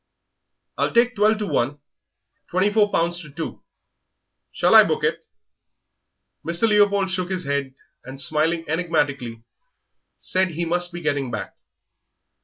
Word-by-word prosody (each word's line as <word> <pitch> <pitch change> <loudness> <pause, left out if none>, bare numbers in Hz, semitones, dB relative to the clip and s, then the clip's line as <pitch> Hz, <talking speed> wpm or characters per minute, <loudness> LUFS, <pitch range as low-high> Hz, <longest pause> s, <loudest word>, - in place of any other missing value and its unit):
"I'll - - +1
take 240 +1 +3
twelve 215 +1 +3
to 210 - -3
one 145 -6 -1 0.7
twenty 190 +3 +1
four 210 -1 +3
pounds 170 +1 0
to 150 - -11
two. 155 +3 -7 0.9
Shall - - +2
I - - +10
book - - -2
it?" - - -1 1.2
Mr. 170 +7 +1
Leopold 200 -2 +3
shook 185 -1 -2
his 185 -2 -3
head, 140 -1 -2 0.3
and, 135 +1 -10
smiling 160 +3 0
enigmatically, 145 -8 -2 0.8
said 185 0 +1
he 170 +1 -2
must 175 +1 0
be 175 0 -7
getting 140 -4 -1
back. 110 -4 -6
170 Hz, 135 wpm, -22 LUFS, 145-190 Hz, 1.2 s, I